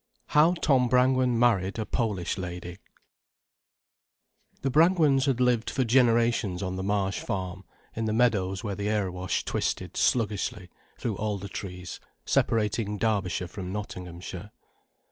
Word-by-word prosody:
HOW 155 +4 +5
TOM 130 -7 +2
BRANGWEN 125 -1 +3
MARRIED 100 -5 +2
A 110 - -2
POLISH 105 -7 -2
LADY 90 -1 -5
I 90 - -12 1.9
The 135 - 0
Brangwens 155 -3 +4
had 130 -3 +1
lived 125 -2 +2
for 130 - 0
generations 115 -6 +2
on 95 -1 -3
the 95 - -3
Marsh 95 0 0
Farm, 95 0 -4 0.3
in 115 - -2
the 110 - 0
meadows 105 -5 +1
where 105 -3 -2
the 100 +1 -2
Erewash 95 -4 -1
twisted - - -2
sluggishly 105 -4 0 0.3
through 110 -5 -3
alder 105 -2 -3
trees, 90 -3 -7 0.3
separating 105 -1 +1
Derbyshire 100 -5 0
from 95 -1 -7
Nottinghamshire. 90 -1 -7
105 Hz, 130 wpm, -27 LUFS, 95-120 Hz, 1.9 s, HOW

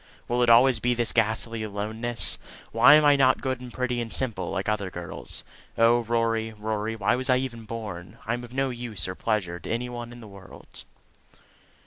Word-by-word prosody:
Will 120 +1 0
it 120 - +3
always 120 +1 +6
be 120 +2 +1
this 120 -1 0
ghastly 115 0 0
aloneness? 110 +3 -2 0.3
Why 145 - +7
am 155 0 +5
I 145 -1 +6
not 130 -2 +4
good 130 -2 -3
and 125 -1 -9
pretty 125 0 -2
and 115 -1 -5
simple 105 -9 +1
like 95 -1 -3
other 105 -3 -1
girls? 90 -1 -5 0.3
Oh, 115 +1 +5
Rory, 115 -1 -1
Rory, 110 +1 -3
why 105 0 +1
was 130 +2 -2
I 130 - +5
ever 130 -2 -3
born? 110 -6 -7
I 115 - -1
am 120 +1 -4
of 120 - -11
no 135 0 -1
use 120 -7 -3
or 95 - -4
pleasure 90 -4 -2
to - - -9
any 120 +2 -2
one 120 -1 -7
in 120 - -11
all - - -12
the - - -13
world!" 95 -1 -12
115 Hz, 205 wpm, -26 LUFS, 105-125 Hz, 0.3 s, Why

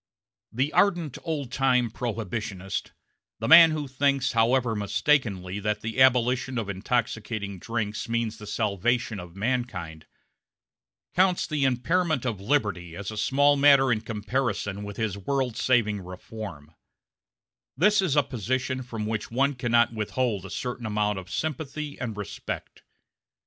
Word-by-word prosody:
The 135 +6 -1
ardent 175 -6 +2
old 145 -6 -3
time 125 -3 +2
Prohibitionist 105 -5 -4 0.5
the 110 - -3
man 165 +2 +10
who 155 -2 -3
thinks, 135 0 +1
however 115 0 +2
mistakenly, 100 -2 0
that 105 +1 -1
the 115 +3 -2
abolition 125 0 +3
of 110 -3 -2
intoxicating 105 -1 -2
drinks 110 +1 -3
means 115 -1 -1
the 105 - -9
salvation 110 +1 0
of 90 -1 -10
mankind 95 -9 -3 1.1
counts 185 0 +3
the 150 -4 0
impairment 155 +3 +1
of 110 -6 -2
liberty 100 - -1
as 100 +2 -5
a - - -7
small 145 +6 +3
matter 140 -2 +6
in 110 -2 +1
comparison 105 -2 -2
with 100 -1 -7
his 105 -3 -2
world 130 +1 -1
saving 110 -5 +2
reform; 90 -4 -9 1.0
this 205 +6 +4
is 170 -7 +1
a 145 - +5
position 130 +2 -2
from 115 -4 -5
which 110 0 -3
one 135 +4 +1
cannot 120 -2 +2
withhold 110 -2 -2
a - - -11
certain 120 +2 -4
measure 105 -1 0
of 95 -1 -11
sympathy 150 +1 -4
and 115 -4 -4
respect. 105 - -6
120 Hz, 140 wpm, -26 LUFS, 105-135 Hz, 1.1 s, man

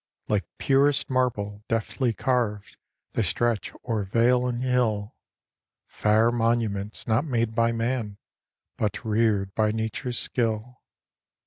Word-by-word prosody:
Like 105 -2 0
purest 140 +1 +2
marble, 105 -5 -1
deftly 115 +2 0
carv'd, 115 -4 -1 0.4
They - - 0
stretch 120 -2 0 0.2
o'er 110 -4 0
vale 120 +5 +2
and 125 0 -2
hill, 115 -5 0 0.7
Fair 110 +2 +2
monuments, 115 -3 0
not 115 +3 +2
made 115 -6 0
by 115 0 +2
man, 115 -3 -2 0.6
But 105 +2 -2
rear'd 105 -3 +1
by 110 0 +2
nature's 110 +3 -2
skill. 115 +1 -1
115 Hz, 115 wpm, -26 LUFS, 105-125 Hz, 0.7 s, purest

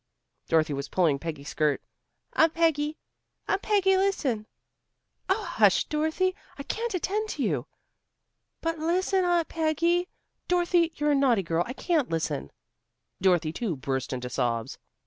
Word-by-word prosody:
Dorothy 155 -2 +2
was 140 0 -4
pulling 160 -7 +2
Peggy's 150 -3 -6
skirt. 150 -2 +1 0.5
"Aunt 320 0 +3
Peggy! 315 -2 +1 0.5
Aunt 390 - +1
Peggy, 390 -2 +3
listen!" 280 - 0 0.8
"Oh, 410 +3 +2
hush, 215 - +3
Dorothy. 315 +5 0 0.2
I 280 - -6
can't 455 +6 -3
attend 420 +4 -1
to 285 - -2
you." 150 - -1 0.9
"But 330 -1 -2
listen, 365 +4 +1
Aunt 345 -2 +2
Peggy 335 +3 +1 0.2
" - - -52
"Dorothy, 350 -1 +2
you're 295 0 +1
a - - +4
naughty 255 -7 +3
girl. 165 0 0
I 250 - -4
can't 310 -1 0
listen." 160 - -2 0.7
Dorothy 175 -4 +3
too 200 -3 -2
burst 130 0 -3
into 125 -1 -3
sobs. 115 -3 -1
295 Hz, 145 wpm, -27 LUFS, -, 0.9 s, a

